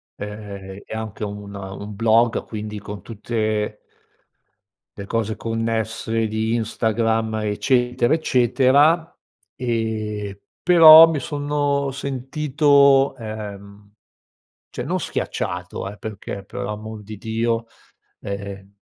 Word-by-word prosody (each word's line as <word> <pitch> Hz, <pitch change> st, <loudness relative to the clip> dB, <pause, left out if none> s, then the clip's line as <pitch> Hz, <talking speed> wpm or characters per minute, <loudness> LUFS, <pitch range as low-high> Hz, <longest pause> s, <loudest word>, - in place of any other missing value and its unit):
ehm, 100 Hz, -2 st, -8 dB
e -, -, -9 dB
anche 110 Hz, -1 st, -5 dB
un 100 Hz, 0 st, -6 dB
un 100 Hz, +1 st, -7 dB
blog 115 Hz, +2 st, +3 dB
quindi 105 Hz, -1 st, -6 dB
con 100 Hz, -1 st, -8 dB
tutte 110 Hz, -1 st, -2 dB, 1.2 s
le 100 Hz, -, -7 dB
cose 110 Hz, -1 st, -1 dB
connesse 115 Hz, 0 st, -2 dB
di 110 Hz, +1 st, -1 dB
Instagram, 110 Hz, 0 st, 0 dB
eccetera, 125 Hz, +3 st, +1 dB
eccetera, 145 Hz, +3 st, +3 dB, 0.4 s
ehm, 110 Hz, -4 st, -3 dB, 0.3 s
però 165 Hz, -2 st, +10 dB
mi 155 Hz, -4 st, -1 dB
sono 145 Hz, -1 st, -1 dB
sentito 140 Hz, +1 st, +3 dB
ehm, 105 Hz, -2 st, -8 dB, 0.8 s
cioè, -, -, -5 dB
non -, -, -1 dB
schiacciato, 90 Hz, +2 st, -4 dB
eh, 105 Hz, -, -12 dB
perché 100 Hz, -2 st, -7 dB
per 125 Hz, -, -8 dB
amor 105 Hz, 0 st, -6 dB
di 105 Hz, 0 st, -9 dB
Dio, 115 Hz, +1 st, -1 dB, 0.5 s
ehm, 100 Hz, -1 st, -7 dB
110 Hz, 100 wpm, -22 LUFS, 105-125 Hz, 1.2 s, però